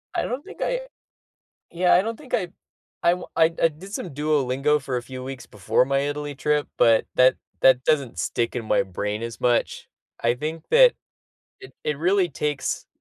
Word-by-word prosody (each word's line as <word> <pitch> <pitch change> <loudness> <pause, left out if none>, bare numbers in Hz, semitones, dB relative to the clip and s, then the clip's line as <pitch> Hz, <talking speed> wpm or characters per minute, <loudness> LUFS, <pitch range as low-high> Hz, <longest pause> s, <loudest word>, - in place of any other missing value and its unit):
I - - +1
don't 260 +4 -4
think 405 - -12
I - - 0 0.9
yeah, 180 +1 +3
I 180 - +6
don't 225 +2 -4
think 285 -4 -14
I 180 - 0 0.5
I 170 - +4
wa 180 - -9
I 160 - +5
d 165 - -10
I 165 - +8
did 180 +6 -12
some 180 - -4
Duolingo 145 0 +1
for 130 -2 -3
a 120 - -3
few 130 +1 -8
weeks 135 -1 -7
before 105 +5 +1
my 135 +1 +1
Italy 145 +1 -3
trip, 150 +1 0
but 115 -1 +4
that 130 0 +5 0.3
that 130 -1 +5
doesn't 140 -5 0
stick 120 +1 -1
in 120 -2 -3
my - - +2
brain 105 +3 -4
as 115 0 -6
much. 120 -1 0 0.4
I 120 +1 +3
think 155 +4 -5
that - - +7 0.7
it 390 - -12
it 150 -2 -1
really 185 +2 +2
takes 150 -4 -3
145 Hz, 195 wpm, -24 LUFS, 125-175 Hz, 0.9 s, I